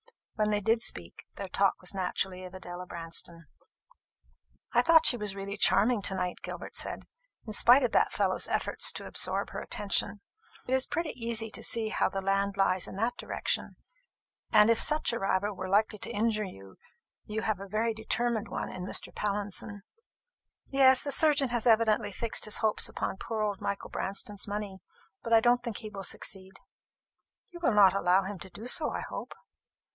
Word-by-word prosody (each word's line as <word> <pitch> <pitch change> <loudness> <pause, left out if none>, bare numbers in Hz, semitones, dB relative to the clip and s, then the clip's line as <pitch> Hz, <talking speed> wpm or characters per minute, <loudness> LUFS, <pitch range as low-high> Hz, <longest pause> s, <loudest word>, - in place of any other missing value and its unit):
When 215 -1 0
they 210 -1 0
did 225 +3 +2
speak, 85 - -6
their 200 - -5
talk 195 +1 +1
was 185 - -2
naturally 185 0 -2
of 185 0 -9
Adela 180 -1 -8
Branston. 165 0 -4 1.3
"I - - +5
thought 325 -1 +5
she - - +9
was 210 -4 -1
really 200 0 -5
charming 215 +2 +4
to 190 - +2
night," 180 -1 -3
Gilbert - - -7
said, - - -2 0.4
"in 215 - -6
spite 245 +6 +6
of 245 - +1
that - - +3
fellow's - - +1
efforts - - +1
to - - -6
absorb - - -1
her - - -5
attention. 205 0 -2 0.5
It 255 - -1
is 265 0 +1
pretty 335 -2 -2
easy 230 -2 -3
to - - -4
see 225 -2 -1
how - - +1
the 195 - -4
land 195 +1 0
lies 190 -2 +2
in - - -9
that 230 +5 -1
direction; - - -3 0.8
and 210 +2 +6
if 230 - +3
such 305 -5 +2
a 235 - -2
rival 195 +1 0
were 185 -1 -6
likely 210 +2 +2
to - - -5
injure 215 0 0
you, 95 - -12 0.5
you 220 +1 -4
have 215 -3 -1
a 195 - -8
very 220 +3 0
determined 220 0 -1
one - - -4
in 180 - -7
Mr. - - 0
Pallinson." 205 0 -2 0.9
"Yes; 265 -1 +5
the 285 - -2
surgeon 290 -3 +3
has 240 0 -1
evidently 220 -2 +3
fixed 225 +3 -2
his 215 - -1
hopes 215 -1 +1
upon - - -4
poor 220 +1 -3
old 205 -2 -2
Michael 200 - -4
Branston's 200 +1 -2
money. 205 -2 -5 0.4
But 230 - -2
I 225 - +8
don't 245 +1 +3
think 235 -4 -5
he 215 -2 -8
will 195 -2 -7
succeed." 190 0 -5 1.0
"You 345 - -10
will 330 -9 +1
not 200 -2 +7
allow 190 0 +3
him 195 0 -6
to 190 - -8
do 220 - -10
so, 300 +5 +2
I - - -4
hope?" - - -7
210 Hz, 190 wpm, -29 LUFS, 195-230 Hz, 1.3 s, she